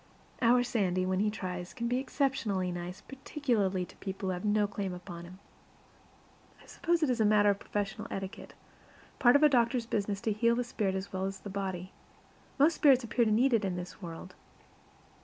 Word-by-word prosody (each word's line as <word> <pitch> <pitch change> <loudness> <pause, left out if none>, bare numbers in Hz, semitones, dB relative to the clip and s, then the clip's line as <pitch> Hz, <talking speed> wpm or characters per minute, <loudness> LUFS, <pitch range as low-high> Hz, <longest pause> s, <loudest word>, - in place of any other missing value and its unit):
Our 245 +1 +5
Sandy, 185 -7 0
when 185 0 0
he 210 +1 +2
tries, 180 -3 -5
can 235 -1 -2
be 245 +2 +1
exceptionally 260 -9 -1
nice, 175 +3 -6
particularly 235 - -1
to - - -17
people 190 -1 -4
who - - 0
have 180 - -5
no 210 0 +2
claim 200 -2 -4
upon 175 -1 -9
him. 180 +2 -12 1.2
I - - -18
suppose 340 -1 0
it 300 - +2
is 240 -2 0
a - - +5
matter 210 -1 +5
of 200 - -3
professional 205 0 -3
etiquette 195 0 -6 0.6
part 245 -1 +6
of 285 - +5
a - - +9
doctor's 240 -3 +2
business 205 -3 -1
to 220 - 0
heal 235 +3 +2
the 245 - 0
spirit 205 -5 -2
as 190 +1 -5
well 190 0 -1
as 195 0 -5
the 200 - -7
body. 190 -2 -4 0.7
Most 300 +4 +5
spirits 270 -5 +5
appear 235 +1 +1
to 215 - +1
need 245 +5 +3
it 225 -2 +3
in 190 -2 -1
this 180 +3 -7
world. 175 +1 -8
205 Hz, 195 wpm, -31 LUFS, 185-240 Hz, 1.2 s, a